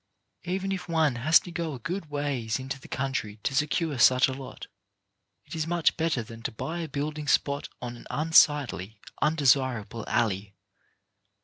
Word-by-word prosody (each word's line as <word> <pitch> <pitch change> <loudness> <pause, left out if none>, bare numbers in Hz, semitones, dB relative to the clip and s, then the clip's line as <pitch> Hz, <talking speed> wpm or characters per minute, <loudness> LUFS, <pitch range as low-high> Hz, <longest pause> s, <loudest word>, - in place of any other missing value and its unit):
Even 190 +2 -2
if 180 -2 -4
one 160 -4 +2
has 155 +7 +6
to 175 - -10
go 165 -3 -3
a - - -9
good 170 - -4
ways 140 -6 -2
into 135 +1 -5
the - - -12
country 130 -6 -3
to - - -1
secure 150 0 0
such 130 +1 +6
a 130 - -3
lot, 135 0 -8 0.8
it - - -11
is 160 -1 -2
much 175 -1 +2
better 160 -7 0
than 115 0 -11
to 120 - -3
buy 160 +9 -5
a 165 - -3
building 150 +2 -4
spot 140 +1 +1
on 120 -1 -5
an 120 - -13
unsightly, 145 - +3 0.2
undesirable 130 -7 +2
alley. 105 -3 0
140 Hz, 170 wpm, -27 LUFS, 120-160 Hz, 0.8 s, has